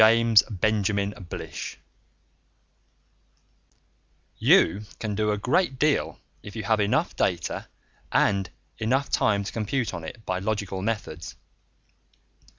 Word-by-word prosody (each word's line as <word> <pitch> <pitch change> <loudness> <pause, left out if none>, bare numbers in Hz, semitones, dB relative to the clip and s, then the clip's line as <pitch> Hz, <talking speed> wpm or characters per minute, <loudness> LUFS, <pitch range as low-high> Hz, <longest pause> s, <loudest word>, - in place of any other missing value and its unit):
net 115 0 +7 0.2
ONE 110 -1 +3
SHOT 100 -3 -3 2.6
_You 105 +6 +3
can 110 -2 -3
do 105 +1 0
a 105 - +1
great 135 - +1
deal 150 +2 +1 0.2
if 105 - -10
you 110 - -4
have 110 +1 +2
enough 100 0 +1
data, 85 -3 -1 0.4
and 100 -2 +2 0.3
enough 130 +5 0
time 100 -1 +2
to 100 - -5
compute 115 +2 -1
on 85 -2 -5
it, 110 +7 -9
by 95 0 -1
logical 100 -1 -2
methods. 95 -7 -4
105 Hz, 115 wpm, -26 LUFS, 100-115 Hz, 2.6 s, net